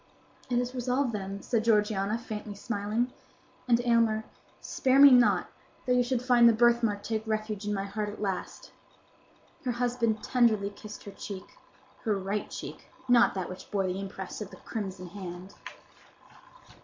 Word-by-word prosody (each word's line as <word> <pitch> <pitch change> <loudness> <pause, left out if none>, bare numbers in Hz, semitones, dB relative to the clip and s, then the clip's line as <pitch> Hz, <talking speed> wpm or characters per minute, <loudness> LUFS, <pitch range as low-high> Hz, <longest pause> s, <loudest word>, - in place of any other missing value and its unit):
"It 245 - +1
is 245 +1 -1
resolved, 250 0 0
then," 195 -1 -5
said 230 -3 0
Georgiana, 210 -1 +2
faintly 215 -3 -6
smiling. 215 +4 -2 0.5
"And, 235 -1 +4
Aylmer, 230 -2 +3 0.4
spare 260 0 +1
me 280 0 +10
not, 245 -1 +5 0.4
though 250 - +2
you 250 - +4
should 245 0 -1
find 240 -2 +6
the - - +4
birthmark 230 -3 +3
take 220 -1 -1
refuge 215 -1 -2
in 210 - 0
my 195 - -2
heart 210 +1 -3
at 205 - -9
last." 195 -3 -4 0.9
Her 250 -2 -1
husband 235 -2 0
tenderly 220 -5 +2
kissed 210 +1 -10
her 200 - -8
cheek—her 205 - -7
right 195 +2 -3
cheek—not 240 -3 0
that 185 -2 -2
which 185 0 -9
bore 195 -2 0
the 185 +1 -2
impress 195 +1 -6
of 205 - -5
the - - -12
crimson 190 -5 -5
hand. 185 0 -8
215 Hz, 155 wpm, -29 LUFS, 200-240 Hz, 0.9 s, me